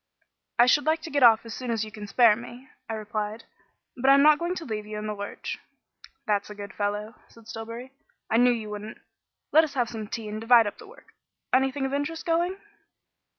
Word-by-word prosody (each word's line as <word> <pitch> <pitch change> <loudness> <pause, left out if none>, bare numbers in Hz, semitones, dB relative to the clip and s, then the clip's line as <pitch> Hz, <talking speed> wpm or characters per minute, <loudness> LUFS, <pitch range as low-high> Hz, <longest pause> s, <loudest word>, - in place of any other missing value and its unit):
"I 240 - +7
should 290 +4 +3
like 320 0 +1
to 330 - -7
get 285 0 +1
off 230 -2 +6
as 230 - -7
soon 250 0 -6
as 225 -2 0
you 215 - -10
can 210 0 -8
spare 225 +1 +5
me," 240 +3 -10 0.2
I - - -2
replied, 215 +1 -4 0.5
"but 260 +2 +1
I'm 280 +1 +7
not 300 0 +6
going 345 +2 -2
to 330 - -6
leave 215 -3 -4
you 215 0 -6
in 210 - -5
the 215 - -2
lurch." 205 0 -6 0.7
"That's 205 -3 0
a 210 - -8
good 200 -1 -8
fellow," 210 +2 -2
said 230 -1 -18
Stillbury. 230 +2 -7 0.4
"I 225 - +2
knew 245 +1 +6
you 225 -3 -2
wouldn't. 210 +1 -7 0.5
Let 315 - +7
us 290 -3 -4
have 245 -3 +1
some 220 -2 -6
tea 225 0 -5
and 215 +1 -5
divide 230 0 +6
up 205 - -5
the 445 - -12
work. 460 - -18 0.4
Anything 270 +1 +2
of 270 - -3
interest 290 +5 -3
going?" 345 +3 +1
230 Hz, 220 wpm, -26 LUFS, 215-275 Hz, 0.7 s, I